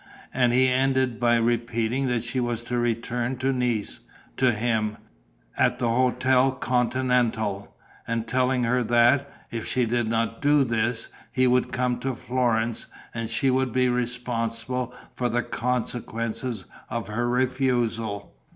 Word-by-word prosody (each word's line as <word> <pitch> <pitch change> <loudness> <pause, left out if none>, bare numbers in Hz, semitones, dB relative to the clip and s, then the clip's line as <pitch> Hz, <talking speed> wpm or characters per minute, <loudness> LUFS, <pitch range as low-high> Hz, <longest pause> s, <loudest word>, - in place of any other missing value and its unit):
And 125 -2 +3
he 130 +2 +4
ended 130 -2 +1
by 120 -1 +4
repeating 120 +2 0
that 120 -2 0
she 125 +2 -2
was 120 -1 -2
to 120 0 -2
return 120 +2 -1
to 135 +2 0
Nice, 120 -4 -1 0.4
to 130 -1 +4
him, 110 -1 -1 0.6
at - - +2
the - - -1
Hôtel 130 +2 +2
Continental, 120 -5 0 0.3
and 115 0 -2
telling 125 +1 +1
her 125 +2 +2
that, 120 +4 +3 0.2
if 115 -2 -4
she 125 -1 +1
did 120 0 0
not 115 0 -1
do 145 0 +4
this, 115 -1 -1 0.2
he 130 -1 +2
would 125 0 +2
come 125 -1 0
to 135 -1 -2
Florence 120 -2 -1 0.3
and 115 -1 -3
she 115 +4 +2
would 130 -1 +1
be 125 +1 +2
responsible 120 0 -2 0.2
for 125 -1 -1
the 120 +1 0
consequences 115 -2 -2 0.2
of 115 -3 -3
her 120 +3 -1
refusal. 120 -5 0
120 Hz, 140 wpm, -25 LUFS, 115-125 Hz, 0.6 s, he